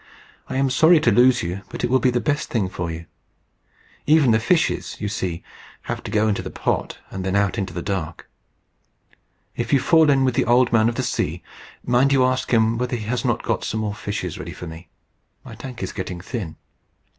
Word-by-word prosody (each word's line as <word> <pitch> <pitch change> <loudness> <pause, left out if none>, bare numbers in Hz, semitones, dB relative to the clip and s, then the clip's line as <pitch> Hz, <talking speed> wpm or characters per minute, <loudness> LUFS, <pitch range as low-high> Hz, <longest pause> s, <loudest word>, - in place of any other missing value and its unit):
I - - -4
am 135 0 +1
sorry 160 +5 +6
to 120 - +3
lose 125 +3 +4
you, 90 +3 -4
but - - -6
it 120 - +1
will 130 - +4
be 130 - +3
the 120 0 +1
best 145 +3 -1
thing 105 -6 0
for 85 -2 -4
you. 85 +1 -6 1.0
Even 150 -5 +5
the 110 - +4
fishes, 160 +8 0
you 105 - -2
see, 95 -5 -3 0.4
have - - -4
to - - -7
go 110 0 +2
into 105 - 0
the - - -6
pot, - - -2
and 95 - -5
then 95 +1 -1
out 100 -1 +1
into 95 -2 -3
the 85 0 -5
dark. 90 -5 -4 1.3
If - - -3
you 140 - +5
fall 160 +2 +4
in 135 -2 +4
with 130 - +1
the - - +1
Old 120 +1 +3
Man 110 0 +4
of 120 - -4
the - - -1
Sea, - - -2 0.4
mind 125 +3 +3
you 130 -2 +4
ask 130 0 0
him 115 -1 +3
whether 125 0 -1
he 110 -3 -5
has 120 +3 -2
not - - 0
got - - -1
some 110 - -2
more 105 -1 -2
fishes 100 -5 -5
ready - - -6
for - - -8
me. 80 0 -10 0.6
My - - -10
tank 125 -5 -8
is 95 - -4
getting 90 -1 -5
thin." 95 -4 -5
115 Hz, 220 wpm, -22 LUFS, 95-130 Hz, 1.3 s, sorry